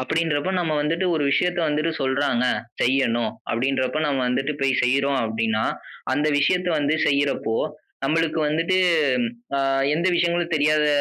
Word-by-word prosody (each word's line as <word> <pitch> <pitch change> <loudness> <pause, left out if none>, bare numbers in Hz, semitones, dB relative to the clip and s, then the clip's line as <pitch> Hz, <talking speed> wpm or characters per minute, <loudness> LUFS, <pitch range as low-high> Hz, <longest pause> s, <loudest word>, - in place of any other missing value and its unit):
அப்படின்றபோ, 160 +4 -1
நம்ம 165 -3 -1
வந்துட்டு 165 +5 0
1 150 -2 0
விஷயத்த 175 +4 +1
வந்துட்டு 155 +2 0
சொல்றாங்க, 130 -2 0 0.4
செய்யணும், 120 -3 +1 0.2
அப்படின்றப்ப 130 +3 0
நாம 135 -3 0
வந்துட்டு 135 +4 -1
போய் 135 -1 +2
செய்றோம் 140 +2 +1
அப்படினா, 110 0 -1 0.5
அந்த 150 +3 +1
விஷயத்த 180 +5 +1
வந்து 145 +1 +1
செய்யறப்போ 140 -5 0 0.5
நம்மளுக்கு 160 +2 0
வந்துட்டு, 165 +5 +1 0.8
ஆ - - +1 0.4
எந்த 170 +3 0
விஷயங்களும் 170 0 0
தெரியாத 150 0 +2
145 Hz, 130 wpm, -23 LUFS, 130-165 Hz, 0.8 s, போய்